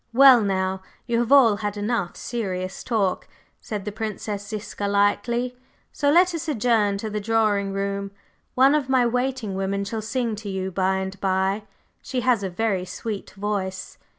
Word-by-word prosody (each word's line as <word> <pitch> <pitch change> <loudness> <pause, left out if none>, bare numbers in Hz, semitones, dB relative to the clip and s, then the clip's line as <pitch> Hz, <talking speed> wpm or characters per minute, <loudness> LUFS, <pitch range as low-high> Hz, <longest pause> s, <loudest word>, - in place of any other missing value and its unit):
"Well, 260 -1 +8
now, 190 -1 -1 0.2
you 235 -1 0
have 240 +2 -1
all 240 -7 +7
had 210 -1 -3
enough 205 -3 -1
serious 190 -5 -4
talk," 210 -6 0 0.3
said 210 -2 -5
the 210 - -3
Princess 210 -1 -4
Ziska 205 -1 -4
lightly, 235 +5 +1 0.4
"so 285 - +1
let 355 +4 +5
us 330 0 -4
adjourn 225 -7 +2
to 215 +2 -4
the 210 - -2
drawing 210 -2 +1
room. 200 0 -2 0.5
One 265 +2 +6
of 290 -3 0
my 260 -2 +4
waiting 250 -3 -1
women 195 +1 -1
shall 220 +2 -3
sing 230 0 -2
to 205 -1 -6
you 190 0 -3
by 190 +1 +1
and 190 +1 -4
by; 195 +2 0 0.4
she 255 -2 -3
has 245 -3 +2
a 195 - -2
very 195 0 -1
sweet 200 +3 -5
voice." 195 -2 -3
210 Hz, 170 wpm, -24 LUFS, 195-235 Hz, 0.5 s, Well